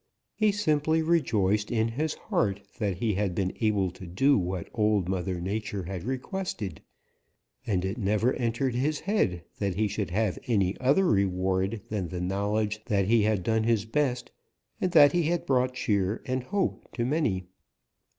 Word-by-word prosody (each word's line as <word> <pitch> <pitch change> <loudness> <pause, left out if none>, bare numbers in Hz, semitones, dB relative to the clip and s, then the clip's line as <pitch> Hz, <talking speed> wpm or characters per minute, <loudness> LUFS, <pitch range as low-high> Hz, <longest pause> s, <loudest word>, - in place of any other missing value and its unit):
He 215 -1 +2
simply 160 -5 +1
rejoiced 105 - +2
in 115 -1 +1
his 150 +7 -2
heart 100 -1 -1 0.2
that 100 -5 -1
he 110 +1 0
had 95 -2 -1
been 95 0 -1
able 100 -4 +2
to 90 +1 -11
do 135 +11 +3
what 90 -2 -2
Old 105 -4 +2
Mother 95 -1 -2
Nature 100 +1 -3
had 90 0 -6
requested, 130 - -4 0.9
and 95 -3 0
it 95 +5 -3
never 105 +4 +2
entered 120 +1 -1
his 140 +5 0
head 95 - 0 0.2
that 100 -3 -1
he 105 +2 +1
should 100 -3 -3
have 105 +1 0
any 100 -5 +2
other 140 +9 +3
reward 95 - +1
than 100 -5 -2
the 90 +2 -5
knowledge 105 +3 -1
that 100 -4 +1
he 115 +3 +4
had 105 -3 +1
done 110 +2 +1
his 110 -3 +1
best 125 +1 -1 0.5
and 185 - +1
that 145 -3 +8
he 175 - +2
had 175 -1 -1
brought 130 -1 +1
cheer 100 -4 0
and 130 -1 -2
hope 200 +3 -1
to 120 - -1
many. 120 - 0
105 Hz, 170 wpm, -28 LUFS, 95-130 Hz, 0.9 s, that